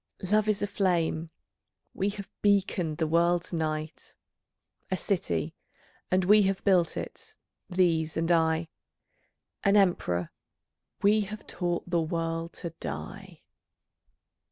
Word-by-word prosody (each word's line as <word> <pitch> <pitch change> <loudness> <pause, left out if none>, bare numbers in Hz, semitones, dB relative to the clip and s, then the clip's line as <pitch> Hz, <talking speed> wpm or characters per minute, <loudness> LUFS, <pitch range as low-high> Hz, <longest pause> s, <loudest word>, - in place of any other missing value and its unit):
Love 215 0 +3
is 205 -1 +1
a - - +3
flame; 175 -5 0 0.6
we 195 - 0
have 200 -1 -7
beaconed 190 -6 +1
the 160 - +1
world's 170 +2 +2
night. 155 -1 -3 0.7
A 185 - 0
city: 85 - -1 0.6
and 185 0 +2
we 210 +3 +7
have 195 -1 0
built 180 -4 +3
it, - - -7 0.3
these 165 -4 +1
and 165 +1 +1
I. 160 -1 +2 0.9
An 200 0 +4
emperor: 90 - +1 0.7
we 210 +2 +5
have 215 +1 -5
taught 175 -1 -2
the 175 -1 +1
world 165 +1 -2
to 170 - -6
die. 75 +2 -7
175 Hz, 120 wpm, -28 LUFS, 160-195 Hz, 0.9 s, we